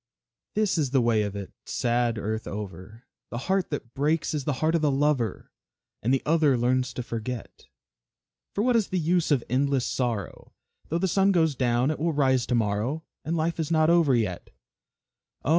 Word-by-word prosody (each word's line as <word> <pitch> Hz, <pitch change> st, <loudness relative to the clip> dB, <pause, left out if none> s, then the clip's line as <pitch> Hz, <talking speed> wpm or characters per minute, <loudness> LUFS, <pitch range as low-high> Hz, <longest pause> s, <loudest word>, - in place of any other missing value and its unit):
This 210 Hz, -5 st, +1 dB
is 145 Hz, -4 st, +1 dB
the 135 Hz, +1 st, +3 dB
way 115 Hz, -3 st, +3 dB
of 100 Hz, -1 st, -3 dB
it, 100 Hz, -2 st, -7 dB
sad 120 Hz, -1 st, 0 dB
earth 110 Hz, +1 st, -3 dB
over, 105 Hz, +3 st, -7 dB, 0.3 s
The 120 Hz, -, -5 dB
heart 190 Hz, +8 st, 0 dB
that 125 Hz, -5 st, -5 dB
breaks 150 Hz, +4 st, 0 dB
is 145 Hz, -3 st, -2 dB
the 150 Hz, -, +1 dB
heart 160 Hz, +1 st, +1 dB
of 165 Hz, -, +2 dB
the 150 Hz, -, +3 dB
lover, 140 Hz, -4 st, 0 dB, 0.5 s
And 120 Hz, -, 0 dB
the 135 Hz, -, +2 dB
other 150 Hz, -4 st, +3 dB
learns 125 Hz, +1 st, +1 dB
to 125 Hz, -, -4 dB
forget. 115 Hz, 0 st, -6 dB, 0.9 s
"For 205 Hz, -, +1 dB
what 250 Hz, 0 st, +3 dB
is 220 Hz, -4 st, +2 dB
the 185 Hz, -, -2 dB
use 170 Hz, 0 st, +1 dB
of 140 Hz, -6 st, +2 dB
endless 135 Hz, +1 st, +1 dB
sorrow? 115 Hz, -8 st, -3 dB, 0.3 s
Though 165 Hz, -, 0 dB
the 190 Hz, +2 st, +1 dB
sun 195 Hz, +2 st, +3 dB
goes 160 Hz, -5 st, +3 dB
down, 125 Hz, +1 st, +1 dB
it 155 Hz, -, -4 dB
will 165 Hz, +1 st, 0 dB
rise 130 Hz, -4 st, +2 dB
to 125 Hz, -, +1 dB
morrow; 115 Hz, +8 st, 0 dB, 0.2 s
And 165 Hz, +3 st, -1 dB
life 165 Hz, +1 st, -1 dB
is 160 Hz, -, -1 dB
not 160 Hz, 0 st, +4 dB
over 165 Hz, -6 st, +4 dB
yet." 95 Hz, -7 st, -2 dB, 1.0 s
Oh! -, -, -1 dB
135 Hz, 195 wpm, -26 LUFS, 120-160 Hz, 1.0 s, not